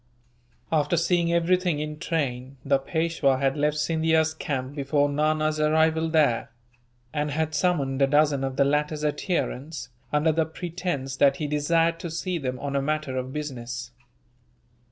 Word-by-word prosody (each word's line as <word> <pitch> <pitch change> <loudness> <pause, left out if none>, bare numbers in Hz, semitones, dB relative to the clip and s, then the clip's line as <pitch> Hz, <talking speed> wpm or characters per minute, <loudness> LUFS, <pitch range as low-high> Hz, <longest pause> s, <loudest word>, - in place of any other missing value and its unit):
After 160 +2 +2
seeing 170 0 +2
everything 175 -1 +2
in 150 0 -4
train, 135 -6 -2
the 140 -1 +3
Peishwa 160 -2 +1
had 135 +1 +1
left 150 0 +1
Scindia's 160 +1 +2
camp 135 -4 -4
before 145 0 +1
Nana's 155 +1 +1
arrival 160 +1 +2
there; 150 -8 +2 0.6
and 150 0 -1
had 155 +2 -1
summoned 145 -4 0
a 135 - +5
dozen 145 -1 +3
of 135 -1 -2
the 140 - +3
latter's 150 +1 0
adherents, 150 -2 -2 0.2
under 150 +2 +3
the 160 +1 +1
pretence 160 -5 -4
that 140 -1 +5
he 155 - -3
desired 165 +3 +1
to 170 - -5
see 175 +2 -2
them 130 -3 -3
on 140 +1 -4
a 140 - +2
matter 150 -2 -2
of 130 0 -3
business. 125 -5 -5
150 Hz, 155 wpm, -25 LUFS, 140-160 Hz, 0.6 s, a